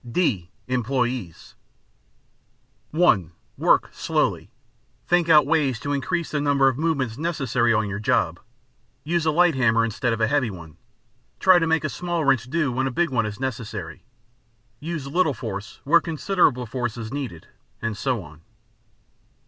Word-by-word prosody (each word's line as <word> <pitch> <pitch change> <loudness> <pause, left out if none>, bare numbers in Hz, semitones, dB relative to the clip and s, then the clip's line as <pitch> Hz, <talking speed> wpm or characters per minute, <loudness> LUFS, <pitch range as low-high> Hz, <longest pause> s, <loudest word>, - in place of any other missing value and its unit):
(d) 120 - -1 0.2
Employees 125 -6 -2 1.4
(1) 105 - +3 0.3
Work - - +3
slowly. - - -1 0.6
Think 175 -1 +2
out 150 -3 +7
ways 140 -6 +1
to 145 0 -2
increase 170 +5 -2
the 150 - -1
number 140 -2 +3
of 130 - +2
movements 140 -6 -1
necessary 135 -8 0
on 110 -1 +1
your 100 0 -4
job: 110 - +1 0.6
use 165 +1 0
a - - +4
light 175 +1 +4
hammer 115 -3 +3
instead 115 +2 -1
of 115 - -1
a 110 - +3
heavy 130 0 +1
one, 85 -5 -11 0.6
try 185 -2 +6
to 165 - 0
make 160 -1 +1
a - - 0
small 170 0 -2
wrench 130 -3 +3
do 155 -2 0
when 130 +2 0
a - - 0
big 170 +4 0
one 115 -4 +1
is 105 -1 -7
necessary, 125 -3 -5 0.8
use 160 -2 -5
little 150 0 +1
force 100 -2 -7
where 160 +5 +4
considerable 155 -5 +1
force 120 0 -3
is 115 +1 -6
needed, 130 - -5 0.3
and 115 -1 -3
so 125 -3 -1
on. 75 0 -15
130 Hz, 155 wpm, -23 LUFS, 115-155 Hz, 1.4 s, out